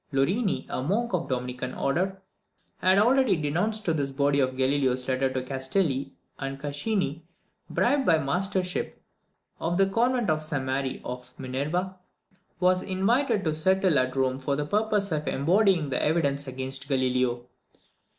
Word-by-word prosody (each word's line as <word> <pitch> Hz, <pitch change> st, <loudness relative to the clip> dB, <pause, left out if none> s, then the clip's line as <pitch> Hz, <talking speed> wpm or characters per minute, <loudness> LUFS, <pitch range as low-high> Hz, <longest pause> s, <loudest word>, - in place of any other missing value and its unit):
Lorini, 185 Hz, -, +1 dB
a -, -, -3 dB
monk 205 Hz, -, -1 dB
of 170 Hz, -2 st, 0 dB
the 130 Hz, -, +2 dB
Dominican 125 Hz, +1 st, -5 dB
order, 185 Hz, +7 st, -1 dB, 0.6 s
had 185 Hz, +1 st, +3 dB
already 240 Hz, 0 st, +4 dB
denounced 180 Hz, +9 st, -1 dB
to 165 Hz, -, +2 dB
this 140 Hz, -3 st, -1 dB
body 140 Hz, +1 st, +1 dB
Galileo's 130 Hz, -1 st, +1 dB
letter 130 Hz, 0 st, +1 dB
to 130 Hz, -1 st, -2 dB
Castelli; 135 Hz, +1 st, -1 dB, 0.2 s
and 135 Hz, 0 st, -4 dB
Caccini, 150 Hz, +2 st, -2 dB, 0.5 s
bribed 285 Hz, -2 st, +1 dB
by 165 Hz, -, +5 dB
the 155 Hz, -, -2 dB
mastership 180 Hz, +5 st, -1 dB, 0.6 s
of 175 Hz, +1 st, -1 dB
the 195 Hz, -, +5 dB
convent 235 Hz, +1 st, +1 dB
of 155 Hz, 0 st, 0 dB
St 150 Hz, -3 st, -2 dB
Mary 130 Hz, 0 st, -2 dB
of 125 Hz, 0 st, -6 dB
Minerva, 155 Hz, +9 st, -2 dB, 0.6 s
was 185 Hz, 0 st, +3 dB
invited 215 Hz, +4 st, +1 dB
to 155 Hz, -, 0 dB
settle 185 Hz, -1 st, +3 dB
at 130 Hz, 0 st, -1 dB
Rome 130 Hz, -1 st, 0 dB
for 140 Hz, +1 st, -1 dB
the 145 Hz, +1 st, -2 dB
purpose 210 Hz, +2 st, 0 dB
of 150 Hz, -1 st, -2 dB
embodying 175 Hz, 0 st, +2 dB
the 125 Hz, -, 0 dB
evidence 145 Hz, -3 st, +1 dB
against 130 Hz, +1 st, -4 dB
Galileo. 125 Hz, -2 st, 0 dB
150 Hz, 150 wpm, -27 LUFS, 135-190 Hz, 0.6 s, by